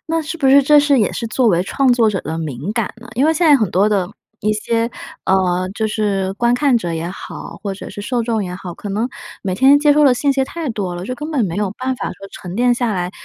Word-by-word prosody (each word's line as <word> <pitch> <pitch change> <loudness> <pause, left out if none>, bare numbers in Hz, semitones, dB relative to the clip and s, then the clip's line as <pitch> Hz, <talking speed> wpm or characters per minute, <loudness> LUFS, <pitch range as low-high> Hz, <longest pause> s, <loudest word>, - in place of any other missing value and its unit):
那 325 0 0
是 320 +2 -5
不 275 -4 +2
是 280 +1 +7
这 295 +2 +6
是 285 -2 +3
也 210 - +1
是 230 - -4
作 235 +2 +1
为 175 -2 +2
创 260 +5 +2
作 230 -3 +3
者 190 - -2
的 160 +1 -5
敏 155 - -4
感 225 -3 -2
呢？ 240 - -13
因 260 +5 +2
为 320 - +4
现 330 +1 +1
在 290 -2 +7
很 215 -8 0
多 195 +3 +3
的 195 -4 0 0.3
一 215 +1 +1
些， 230 +2 -1 0.3
呃， 185 -1 +1
就 220 - -1
是 200 -3 -1
观 240 +2 +1
看 270 -1 +3
者 175 -7 -2
也 165 +1 -3
好， 185 - -8
或 200 -2 -3
者 - - -9
是 - - -8
受 240 +2 -1
众 225 -3 -1
也 180 0 -5
好， 180 -2 -7
可 205 - -8
能 215 +5 -1 0.3
每 185 -2 -2
天 270 +6 +6
接 295 0 +4
受 300 0 +4
的 265 - +6
信 280 +3 +1
息 270 -1 +1
太 325 +1 -5
多 195 -5 -3
了， 175 +1 -6
就 255 - -4
根 300 +4 -6
本 265 -8 +1
没 175 0 -3
有 205 -2 -1
办 260 0 -1
法 - - -4
说 195 0 -10
沉 180 0 -8
淀 245 0 +3
下 235 -3 -1
来， 180 -1 -2
220 Hz, 295 characters per minute, -18 LUFS, 190-265 Hz, 0.3 s, 是